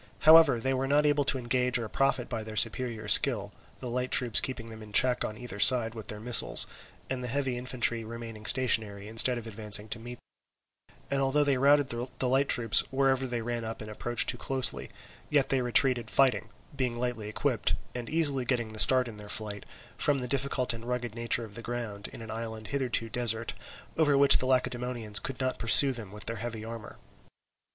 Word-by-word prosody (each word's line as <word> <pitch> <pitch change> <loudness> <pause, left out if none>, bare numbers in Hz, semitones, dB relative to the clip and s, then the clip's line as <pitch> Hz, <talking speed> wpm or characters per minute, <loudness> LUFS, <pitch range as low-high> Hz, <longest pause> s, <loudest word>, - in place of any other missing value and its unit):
However, 155 -5 +6
they 130 +3 -1
were 130 +1 -2
not 145 +2 +2
able 145 -1 +2
to 135 - +4
engage 125 0 0
or 120 - -5
to 110 - -7
profit 130 -1 -1
by 115 -3 -5
their 110 0 -9
superior 115 -1 0
skill, - - +4 0.3
the 125 - -8
light 125 +1 -3
troops 120 -5 +3
keeping 115 -3 -6
them 110 0 -11
in 105 -1 -12
check 125 +4 +2
on 105 - -6
either 115 -4 -9
side 115 0 +6
with 110 -3 -10
their 105 - -5
missiles, 120 +2 +4 0.4
and 130 -1 -5
the - - -4
heavy 130 0 -2
infantry 120 -2 -1
remaining 115 -1 -9
stationary 110 -6 +1
instead 115 +3 +4
of 115 - -8
advancing 105 -1 0
to 115 - -5
meet 120 +2 -10
them; - - -36 0.2
and 140 0 0
although 135 +2 +1
they 140 -3 0
routed 140 0 +3 0.3
the 130 - -1
light 135 +2 +1
troops 115 -3 +4
wherever 135 -1 0
they 120 -2 -4
ran 120 0 -4
up 110 0 -7
and 110 0 -9
approached 120 +3 -2
too 120 - -2
closely, 130 -1 0 0.4
yet 145 -3 +1
they 135 -1 +1
retreated 125 -1 +1
fighting, 130 -6 +1 0.3
being 125 -3 -3
lightly 120 -4 -4
equipped, 105 - -1 0.2
and 120 -1 -7
easily 145 -5 +1
getting 120 -3 -2
the 110 - -6
start 130 +1 +6
in 110 -3 -10
their 105 0 -11
flight, 105 -2 -4 0.3
from 145 -1 +1
the 125 -2 -5
difficult 130 -1 -1
and 115 0 -9
rugged 125 -2 -4
nature 115 0 -1
of 105 - -15
the 115 - -8
ground, 115 -4 -6
in - - -11
an 110 - -9
island 110 -1 -7
hitherto 130 -4 -2
desert, 115 -1 0 0.5
over 145 -3 +3
which 140 0 +6
the 130 - -2
Lacedaemonians 125 -4 -1
could 135 - -7
not 130 -1 -3
pursue 135 +4 +6
them 115 -6 -6
with 105 0 -4
their 115 - -3
heavy 115 0 -6
armour. 115 -1 -9
120 Hz, 205 wpm, -28 LUFS, 110-130 Hz, 0.5 s, However